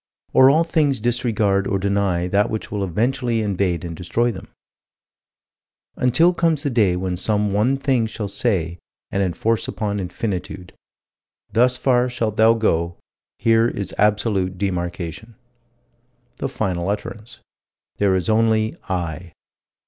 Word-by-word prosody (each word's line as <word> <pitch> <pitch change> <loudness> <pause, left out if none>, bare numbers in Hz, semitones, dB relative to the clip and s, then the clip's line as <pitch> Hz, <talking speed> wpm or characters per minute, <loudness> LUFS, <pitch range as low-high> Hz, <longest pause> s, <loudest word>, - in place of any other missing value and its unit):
Or 130 0 +7
all 155 +4 +4
things 150 -6 +1
disregard 110 -4 +1
or 100 - 0
deny 100 -3 0
that 100 +4 +2
which 110 - -4
will 105 -2 -2
eventually 115 +4 0
invade 95 -4 -1
and 85 -1 -5
destroy 115 +8 0
them 95 -4 -9 1.5
Until 160 +8 +3
comes 165 -4 +1
the 140 - -1
day 105 -7 +3
when 90 0 -2
some 105 +2 0
one 120 +7 +2
thing 130 -4 +1
shall 110 -2 -5
say, 90 -6 -1 0.3
and 100 - 0
enforce 100 +5 0
upon 105 -2 -2
Infinitude: 95 -2 -5 0.8
"Thus 125 +2 +3
far 125 -1 +2
shalt 115 -4 -2
thou 110 +1 +5
go: 85 -6 0 0.4
here 115 0 +3
is 100 -5 -4
absolute 105 -3 +1
demarcation." 90 +3 -4 1.0
The - - -3
final 90 -1 -2
utterance: 110 +3 -5 0.6
"There 100 -2 +2
is 90 - -1
only 110 0 +2 0.2
I." 85 -2 -4
105 Hz, 135 wpm, -21 LUFS, 95-120 Hz, 1.5 s, Or